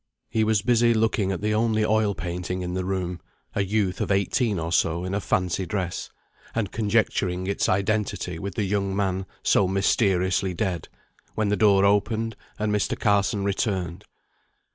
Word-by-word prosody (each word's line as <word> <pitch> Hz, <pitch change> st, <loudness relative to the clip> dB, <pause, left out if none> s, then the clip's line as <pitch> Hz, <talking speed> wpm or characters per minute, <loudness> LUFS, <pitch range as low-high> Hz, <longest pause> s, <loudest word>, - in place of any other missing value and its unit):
He 110 Hz, -, +2 dB
was 110 Hz, -2 st, +2 dB
busy 120 Hz, -1 st, +4 dB
looking 110 Hz, -3 st, +1 dB
at 95 Hz, -, -3 dB
the 105 Hz, 0 st, 0 dB
only 110 Hz, 0 st, +2 dB
oil 110 Hz, -2 st, +2 dB
painting 90 Hz, +1 st, -4 dB
in 90 Hz, 0 st, -3 dB
the 95 Hz, 0 st, -1 dB
room 90 Hz, -2 st, -3 dB, 0.3 s
(a 100 Hz, -, +1 dB
youth 100 Hz, -2 st, 0 dB
of -, -, -1 dB
eighteen 100 Hz, +2 st, +1 dB
or 85 Hz, 0 st, -3 dB
so, 85 Hz, 0 st, +1 dB
in 95 Hz, -, -3 dB
a 100 Hz, -, 0 dB
fancy 90 Hz, 0 st, 0 dB
dress), 95 Hz, -4 st, -3 dB, 0.5 s
and 110 Hz, -4 st, -1 dB
conjecturing 100 Hz, -4 st, 0 dB
its 100 Hz, +3 st, 0 dB
identity 100 Hz, -3 st, -1 dB
with 100 Hz, +3 st, -5 dB
the 110 Hz, -, 0 dB
young 100 Hz, 0 st, -1 dB
man 95 Hz, -1 st, -1 dB, 0.2 s
so 95 Hz, -, +3 dB
mysteriously 95 Hz, -1 st, +1 dB
dead, 90 Hz, -4 st, -2 dB, 0.5 s
when 110 Hz, -2 st, 0 dB
the 105 Hz, -, +2 dB
door 100 Hz, -2 st, +4 dB
opened, 110 Hz, +2 st, +1 dB, 0.2 s
and 105 Hz, 0 st, 0 dB
Mr. 105 Hz, -, 0 dB
Carson 100 Hz, 0 st, +2 dB
returned. 95 Hz, -2 st, -2 dB
100 Hz, 165 wpm, -25 LUFS, 95-110 Hz, 0.5 s, busy